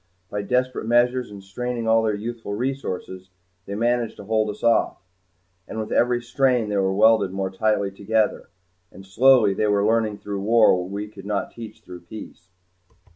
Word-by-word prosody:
By 105 - -2
desperate 125 +2 -1
measures 120 +1 +2
and 100 -1 -11
straining 120 +4 -4
of 110 - +2
all 115 - +4
their 110 -2 0
youthful 115 0 -5
resources 100 -7 -4 0.4
they 100 - -4
managed 120 +1 0
to - - -9
hold 110 +1 0
us 105 - -8
off. 115 0 +2 0.7
And - - -7
with 110 - -5
every 120 0 +2
strain 125 -2 +1
they 105 - -1
were 95 -1 +1
welded 110 0 +4
more 95 0 -3
tightly 100 0 0
together. 110 +3 -1 0.4
And 95 - -13
slowly 115 +1 +4
they 105 +2 0
were 100 -1 +2
learning 110 -1 +1
through 100 -1 -5
war 110 0 +5
what 90 0 -4
we 100 +2 -5
could 100 -2 -12
not 105 -1 -2
teach 115 -2 -10
through 90 -1 -10
peace. 90 0 -11
110 Hz, 180 wpm, -23 LUFS, 100-120 Hz, 0.7 s, war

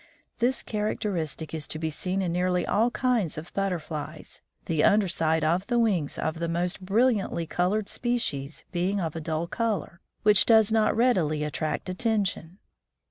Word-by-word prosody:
"This 250 +3 +1
characteristic 185 -8 -3
is 155 -2 -3
to - - -3
be 160 0 -2
seen 185 +5 -2
in 175 - -1
nearly 180 +1 +1
all 225 +4 +2
kinds 240 - 0
of 160 +3 -8
butterflies, 155 -5 -4 0.2
the 160 -3 +1
under 205 -1 +4
side 160 -2 +1
of 175 +5 +1
the 240 -1 +1
wings 195 -11 +1
of 160 +1 -2
the 170 0 -2
most 175 +2 -1
brilliantly 205 -3 +1
colored 190 +6 0
species 165 - -2
being 185 +3 0
of 165 -3 -3
a 165 - -4
dull 160 +1 -2
color 210 -3 -2 0.2
which 210 -2 +5
does 220 -2 +5
not 220 -1 +2
readily 175 -12 +2
attract 155 +3 -3
attention. 190 -3 -1
180 Hz, 160 wpm, -27 LUFS, 160-215 Hz, 0.2 s, which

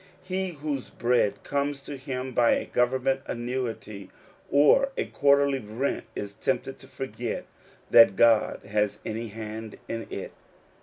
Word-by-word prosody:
He 185 0 -2
whose 145 -3 -4
bread 120 -3 +1
comes 140 0 -1
to 145 - -6
him 130 -1 -5
by 120 -1 +4
a - - -2
government 130 +2 +1
annuity 120 -4 -4 0.4
or 150 - +5
a - - 0
quarterly 140 -1 +3
rent, 115 +5 -3
is 100 -1 -5
tempted - - -2
to - - -13
forget - - -5 0.5
that 115 -4 +8
God 115 -1 +4
has 105 0 0
any 115 +1 -3
hand 110 0 -7
in 115 0 -4
it. - - -6
125 Hz, 140 wpm, -27 LUFS, 110-140 Hz, 0.5 s, that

